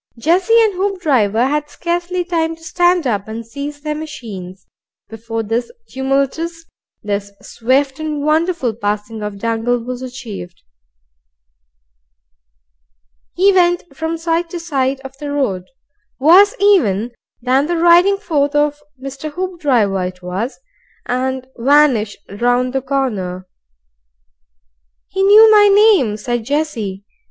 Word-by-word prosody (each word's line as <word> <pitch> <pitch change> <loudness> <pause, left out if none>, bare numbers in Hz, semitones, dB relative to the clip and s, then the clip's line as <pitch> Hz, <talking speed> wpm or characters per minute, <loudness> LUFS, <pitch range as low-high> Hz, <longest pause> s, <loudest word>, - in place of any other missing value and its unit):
Jessie 365 - +3
and 430 -2 +1
Hoopdriver 295 - +1
had 295 +1 -2
scarcely 350 +3 -2
time 330 -2 -1
to 325 - -21
stand 350 0 +1
up 205 -5 -1
and 225 +1 -6
seize 285 +5 -7
their 300 0 -3
machines, 205 - -8 0.4
before 225 +1 -5
this 230 - -2 0.2
tumultuous, 275 +5 -2 0.4
this 200 -1 -3
swift 265 +4 0
and 305 -2 -3
wonderful 310 -4 +1
passing 210 +1 -3
of 210 -1 -5
Dangle 230 +3 -1
was 245 +1 -6
achieved. 235 -9 -8 2.7
He 390 +2 +4
went 350 -1 +3
from 320 +1 -3
side 335 +1 -1
to 345 - -5
side 275 -5 -1
of 270 0 -10
the 290 -1 -5
road, 205 -11 -1 0.5
worse 365 +9 +6
even 245 - +3 0.3
than 260 +4 +1
the 345 0 -1
riding 345 +4 +5
forth 295 -7 -1
of 295 0 +1 0.2
Mr. 275 +3 -7
Hoopdriver 280 - 0
it 180 0 -11
was, 190 +9 -4 0.5
and 260 +1 -2
vanished 255 -5 +3 0.2
round 245 +1 +1
the 270 - 0
corner. 205 -10 -3 1.6
"He 385 - -2
knew 425 +3 +7
my 415 -1 +7
name," 400 - +4
said 240 +2 -3
Jessie. 230 -8 -3
275 Hz, 125 wpm, -17 LUFS, 225-335 Hz, 2.7 s, knew